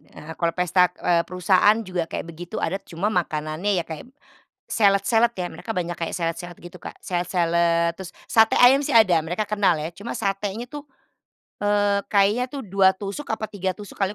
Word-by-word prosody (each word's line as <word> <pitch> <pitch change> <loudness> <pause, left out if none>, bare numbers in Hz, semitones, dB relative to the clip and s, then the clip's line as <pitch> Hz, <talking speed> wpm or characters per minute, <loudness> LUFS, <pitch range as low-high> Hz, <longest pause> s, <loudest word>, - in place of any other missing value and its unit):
eee, 160 +2 -9
kalau 170 -1 0
pesta 180 0 +3
d - - -25
eee, 170 -1 +3
perusahaan 185 +3 +3
juga 180 -3 -3
kayak - - -4
begitu 170 +1 -9
adat, 195 +4 -3
cuma 185 +6 -2
makanannya 170 +1 -1
kayak 160 +8 -9 0.6
salad-salad 225 +3 +3
ya, 180 -5 -4
mereka 225 - -7
banyak 175 -4 -3
kayak 165 - -4
salad-salad 175 0 -4
gitu 175 +1 -12
Kak, - - -9
salad-salad, 170 -1 0
terus 190 -2 -9 0.2
sate 225 -1 +4
ayam 265 +3 +6
sih 280 - -2
ada, 185 -9 +5
mereka 180 +6 -3
kenal 205 -4 +2
ya, 155 - -3
cuma 205 +6 -7
satenya 205 +3 -3
tuh, 290 +2 -8 0.8
eee, 205 -1 +2
kayaknya 205 +4 +2
tuh 275 +1 -7
2 190 -1 +3
tusuk, 200 +9 -6
apa 220 -1 -4
3 190 -3 -3
tusuk 205 -1 -12
kali 195 0 0
190 Hz, 180 wpm, -23 LUFS, 170-210 Hz, 0.8 s, ayam